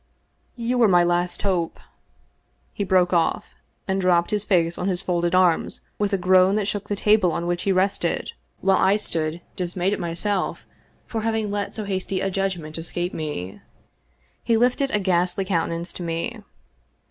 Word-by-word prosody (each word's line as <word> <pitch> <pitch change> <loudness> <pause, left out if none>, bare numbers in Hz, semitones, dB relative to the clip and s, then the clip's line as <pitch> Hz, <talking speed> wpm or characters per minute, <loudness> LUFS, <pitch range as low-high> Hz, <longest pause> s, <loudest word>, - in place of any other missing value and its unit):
" - - -44
You 245 +1 -1
were 230 - +6
my 175 -3 +5
last 175 0 0
hope." 180 -5 -1 0.9
He 205 - -2
broke 185 -2 +3
off, 170 -2 +1 0.4
and 190 0 0
dropped 175 -2 +2
bis 210 -1 0
face 170 -4 +2
on 180 - -1
his 180 -2 +1
folded 175 -2 0
arms 180 -3 +2 0.2
with 205 0 0
a 195 - +2
groan 185 +1 +4
that 210 -2 0
shook 205 -1 -3
the 205 - 0
table 210 -3 +3
on 170 - -2
which 175 0 -1
he 195 - +1
rested, 190 +1 0 0.3
while 190 0 +3
I 190 +1 +4
stood 165 -5 -2
dismayed 180 +2 -1
at - - -3
myself 180 +3 -2 0.4
for 225 - -3
having 220 -2 -1
let 205 0 -3
so 220 - -4
hasty 190 -1 -2
a 195 +1 -1
judgment 180 -5 -2
escape 175 +2 -3
me. 145 - -5 0.8
He 230 -1 +2
lifted 250 +4 +2
a 210 - +1
ghastly 180 0 +1
countenance 170 -2 -2
to - - -8
me. 165 -1 -3
185 Hz, 175 wpm, -23 LUFS, 175-200 Hz, 0.9 s, were